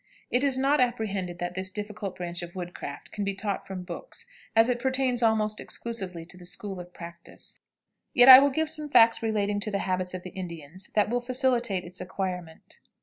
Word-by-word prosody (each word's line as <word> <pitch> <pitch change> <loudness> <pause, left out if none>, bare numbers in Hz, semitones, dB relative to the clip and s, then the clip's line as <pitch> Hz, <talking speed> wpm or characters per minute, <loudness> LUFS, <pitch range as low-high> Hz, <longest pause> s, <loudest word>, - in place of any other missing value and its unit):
It 250 +2 +2
is 275 -2 +2
not 275 +2 +3
apprehended 205 -7 -1
that 175 0 -4
this 185 +1 -2
difficult 205 -1 -6
branch 175 -1 -4
of 175 +1 -8
woodcraft 175 -1 -7
can 205 - -3
be 200 -1 -1
taught 200 0 -3
from 185 -1 -6
books, 470 - -8 0.3
as 225 +1 +6
it 245 -1 0
pertains 260 -1 +1
almost 215 -2 +2
exclusively 190 -8 -4
to 180 - -10
the 180 - -12
school 195 0 -6
of 175 0 -10
practice, 170 -1 -10 0.5
yet 245 +1 +7
I 260 0 +13
will 280 +1 +4
give 315 +3 0
some 305 -1 -4
facts 230 -4 +6
relating 205 -2 0
to 210 - -2
the 200 - -1
habits 185 -1 -1
of 180 - -7
the 185 - -8
Indians 175 -1 -8
that 210 0 +3
will 245 0 +1
facilitate 245 -6 +1
its 180 +1 -10
acquirement. 180 -3 -6
205 Hz, 200 wpm, -27 LUFS, 180-245 Hz, 0.5 s, I